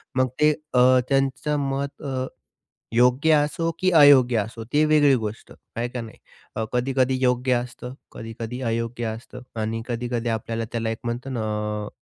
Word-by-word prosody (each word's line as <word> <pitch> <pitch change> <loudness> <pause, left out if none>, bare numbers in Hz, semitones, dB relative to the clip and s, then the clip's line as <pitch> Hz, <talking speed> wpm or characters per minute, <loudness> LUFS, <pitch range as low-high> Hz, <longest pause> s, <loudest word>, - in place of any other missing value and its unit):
मग 130 0 +3
ते 150 0 +6 0.2
अ, 125 +1 +6
त्यांचं 135 +2 +1
मत 140 +1 -4
अ, 130 -2 -2 0.7
योग्य 125 +6 +4
असो 150 +3 +1
की 185 - +2
अयोग्य 135 -5 +7
असो 115 +2 -4
ती 150 +1 +4
वेगळी 150 -2 +5
गोष्ट, 110 -2 -6 0.2
आहे 120 +1 -1
का 125 0 -5
नाही. 115 -1 -9 0.4
अ, 110 - -1
कधी-कधी 130 +1 +1
योग्य 125 0 +2
असतं, 125 +1 -4 0.2
कधी-कधी 115 +2 -7
अयोग्य 115 +1 -2
असतं 115 +3 -7 0.2
आणि 110 +1 -2
कधी-कधी 120 0 -2
आपल्याला 115 0 -2
त्याला 115 -1 -1
एक 110 - -4
म्हणतं 120 +3 -4
ना 120 - -2 0.5
अ, - - -6
125 Hz, 160 wpm, -24 LUFS, 115-135 Hz, 0.7 s, अयोग्य